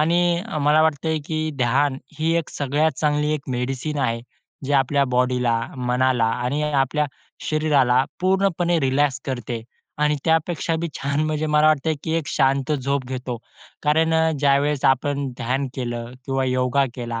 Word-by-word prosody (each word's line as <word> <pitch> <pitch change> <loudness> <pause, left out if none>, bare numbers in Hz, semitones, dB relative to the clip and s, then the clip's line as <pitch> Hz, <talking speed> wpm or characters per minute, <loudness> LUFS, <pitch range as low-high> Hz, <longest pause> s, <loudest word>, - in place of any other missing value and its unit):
आणि 170 +2 +2 0.2
मला 150 +2 +4
वाटतंय, 160 0 +1
की 155 0 -2
ध्यान 130 +2 +2 0.2
ही 160 +1 +1
एक 165 - -4
सगळ्यात 145 +3 0
चांगली 150 0 +1
एक 150 -3 -4
मेडिसिन 130 +4 -2
आहे. 115 -4 0 0.4
जे 140 - -2
आपल्या 140 +1 +2
बॉडीला, 125 -1 +2 0.2
मनाला 125 -1 +1 0.2
आणि 145 +4 -1
आपल्या 145 +2 +1 0.4
शरीराला 140 -5 +3 0.2
पूर्णपणे 185 -2 +2
रिलॅक्स 135 -1 +1
करते 120 -3 -4 0.4
आणि 150 0 +2
त्यापेक्षाबी 165 0 0
छान 140 +1 -1
म्हणजे 155 0 -1
मला 150 0 +3
वाटतं, 155 0 +3
की 160 - -2
एक 160 -3 -2
शांत 135 0 +1
झोप 140 -1 -1
घेतो. 125 -1 -4 0.5
कारण 160 +2 +2
अ, 160 0 +3
ज्यावेळेस 140 0 +2
आपण 140 +1 +2
ध्यान 130 +3 -1
केलं, 120 -1 -4
किंवा 135 0 0
योगा 130 +1 +1
केला 120 -2 -4
140 Hz, 145 wpm, -22 LUFS, 130-155 Hz, 0.5 s, मला